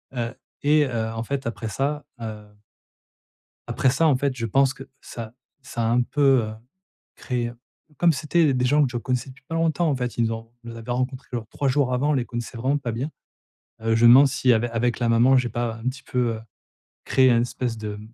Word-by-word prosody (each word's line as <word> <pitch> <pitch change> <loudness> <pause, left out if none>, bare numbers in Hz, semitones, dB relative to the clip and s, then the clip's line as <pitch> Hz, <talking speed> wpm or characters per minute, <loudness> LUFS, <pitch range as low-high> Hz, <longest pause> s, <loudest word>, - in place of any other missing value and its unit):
heu, 120 0 -2 0.3
et, 150 +1 +4
heu, 115 -4 -2
en 115 0 -3
fait 140 +3 -3
après 115 -1 -4
ça, 140 +7 -2 0.2
heu 105 -2 -7 1.2
après 130 - +2
ça 150 +6 +3
en 145 - +4
fait 135 0 -1
je 115 -2 -3
pense 135 +4 +3
que 135 - -10 0.2
ça 115 -1 -8 0.3
ça 125 -2 -4
a 115 - +1
un 120 +1 +3
peu, 135 -1 +3
heu, 110 - -6 0.6
créé 120 -2 -3 0.5
comme 175 -1 +4
c'était 155 +1 +2
des 125 -1 +1
gens 145 +4 +4
que 130 - -1
je 120 - -2
connaissais 125 +2 -2
depuis 135 +2 -15
pas 165 - -4
longtemps 165 0 +1
en 145 - +1
fait. 125 -2 -4
Ils 115 - +2
nous 115 - -1
ont 115 0 -8
ils 120 - -8
nous 115 - -9
avaient 115 +1 -6
rencontrés 130 +2 -2
genre 115 -3 -3
3 140 - -2
jours 130 -1 +2
avant. 140 +4 +1
On - - +2
les 130 -4 0
connaissait 120 +1 -6
vraiment 130 +5 +1
pas 130 -4 -4
bien. 125 +7 -3 0.7
Heu, 115 0 +1
je 115 +1 +4
me - - +9
demande 135 +4 +8
si 130 -1 +2
avec 115 +1 0
avec 120 0 0
la 120 -2 +1
maman 120 +3 +5
j'ai 125 -1 +1
pas 120 0 -2
un 110 - -12
petit 140 +1 -9
peu, 125 -3 -1
heu, 110 - -8 0.6
créé 130 -1 +4
un 115 -1 +4
espèce 120 -1 -3
de 105 -1 -5
125 Hz, 230 wpm, -24 LUFS, 115-135 Hz, 1.2 s, me